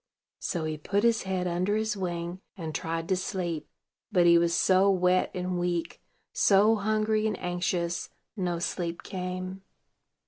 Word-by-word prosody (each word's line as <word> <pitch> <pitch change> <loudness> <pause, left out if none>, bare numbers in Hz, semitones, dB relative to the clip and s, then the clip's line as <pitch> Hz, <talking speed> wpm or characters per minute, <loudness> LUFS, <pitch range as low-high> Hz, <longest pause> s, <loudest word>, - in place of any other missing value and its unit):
So 170 -3 -2
he 155 -1 -3
put 200 +7 0
his 230 -2 +3
head 185 -1 0
under 180 +4 0
his 220 0 0
wing, 175 -1 -3 0.2
and 160 -3 -5
tried 165 +2 -3
to 190 - +3
sleep; 175 -4 -3 0.4
but 175 -2 +4
he 170 0 +7
was 170 0 +2
so 190 +1 +4
wet 185 -1 +3
and 180 0 -2
weak, 175 -1 -2 0.3
so 205 +2 +5
hungry 215 +1 +1
and 215 - -2
anxious, 175 -1 -1 0.3
no 180 -4 -1
sleep 170 0 -3
came. 185 0 -5
180 Hz, 150 wpm, -28 LUFS, 170-195 Hz, 0.4 s, he